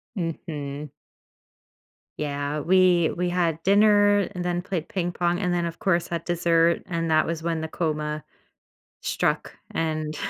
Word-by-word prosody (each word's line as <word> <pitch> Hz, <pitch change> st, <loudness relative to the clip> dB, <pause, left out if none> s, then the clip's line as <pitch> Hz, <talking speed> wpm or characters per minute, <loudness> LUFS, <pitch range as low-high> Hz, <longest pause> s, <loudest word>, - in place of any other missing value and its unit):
Mhm. 150 Hz, -5 st, -4 dB, 1.3 s
Yeah, 145 Hz, 0 st, -2 dB
we 180 Hz, 0 st, +4 dB
we 180 Hz, 0 st, 0 dB
had 170 Hz, -3 st, 0 dB
dinner 205 Hz, 0 st, +5 dB
and 180 Hz, -1 st, -4 dB
then 175 Hz, 0 st, -1 dB
played 180 Hz, -4 st, -4 dB
ping 175 Hz, -2 st, -1 dB
pong 175 Hz, 0 st, 0 dB
and 180 Hz, -3 st, 0 dB
then, 175 Hz, -1 st, 0 dB
of 170 Hz, 0 st, -5 dB
course, 175 Hz, -5 st, +1 dB
had 170 Hz, -1 st, -4 dB
dessert, 170 Hz, -1 st, +2 dB
and 165 Hz, -2 st, -2 dB
that 155 Hz, 0 st, +4 dB
was 165 Hz, 0 st, -3 dB
when 165 Hz, -1 st, -1 dB
the 160 Hz, -, -3 dB
coma 150 Hz, -2 st, -2 dB, 0.8 s
struck, -, -, -1 dB, 0.2 s
and 155 Hz, -1 st, -2 dB
170 Hz, 145 wpm, -25 LUFS, 155-180 Hz, 1.3 s, dinner